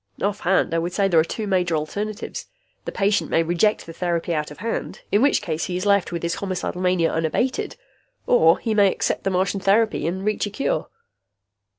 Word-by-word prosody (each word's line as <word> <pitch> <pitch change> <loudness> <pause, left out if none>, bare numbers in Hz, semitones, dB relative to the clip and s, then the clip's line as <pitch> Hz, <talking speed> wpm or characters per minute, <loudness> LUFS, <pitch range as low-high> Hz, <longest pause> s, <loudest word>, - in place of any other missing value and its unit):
Offhand, 190 -4 +1
I 165 - +2
would 175 +2 -3
say 200 0 +2
there 170 -4 +4
are - - +5
two 215 +6 -4
major 180 -4 +1
alternatives: 205 +8 -4 0.4
the - - -4
patient 200 +1 +1
may 165 - +2
reject 175 +6 +1
the 165 - -9
therapy 170 -1 -1
out 150 -1 -2
of 150 - -11
hand, 225 +7 -4
in 205 - +3
which 280 +2 +3
case 160 -1 -2
he 180 - -3
is 185 - -3
left 200 -3 +3
with 170 -1 -4
his 170 0 0
homicidal 185 -2 -3
mania 180 -2 +2
unabated. 165 +11 -1 0.5
Or 165 -8 +5
he 225 - -2
may 200 -2 +5
accept - - -2
the - - +2
Martian 190 +1 0
therapy 205 -1 +2
and 190 +3 -3
reach 215 0 0
a - - -4
cure." 205 - -1
185 Hz, 205 wpm, -23 LUFS, 170-205 Hz, 0.5 s, are